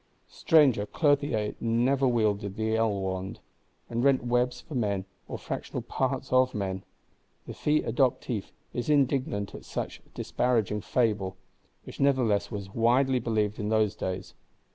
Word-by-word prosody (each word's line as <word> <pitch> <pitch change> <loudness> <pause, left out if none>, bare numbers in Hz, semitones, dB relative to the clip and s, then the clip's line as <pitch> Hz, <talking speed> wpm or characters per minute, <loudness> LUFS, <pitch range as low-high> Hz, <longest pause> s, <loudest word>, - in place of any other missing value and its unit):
Stranger 135 -10 +4
Clothier 140 -9 +1
never 125 +4 +2
wielded 105 -4 +1
the 110 0 0
ell 115 -1 +2
wand, 95 0 -4 0.5
and 120 +1 -2
rent 135 -2 +4
webs 125 +1 +1
for - - -11
men, 100 -6 0 0.2
or - - -5
fractional - - -5
parts 130 -1 -2
of 130 -1 +4
men. 95 -2 -3 0.6
The - - -7
Fils 150 +1 +1
Adoptif 120 -3 0 0.3
is 120 +4 -3
indignant 135 -8 +1
at - - -9
such - - -5
disparaging 110 -4 0
fable,—which 95 -6 -3
nevertheless 130 -7 +2
was 100 -3 -6
widely 125 +3 +3
believed 110 -3 -1
in 105 0 -2
those 110 -2 +2
days. 95 0 -4
115 Hz, 135 wpm, -28 LUFS, 105-130 Hz, 0.6 s, Stranger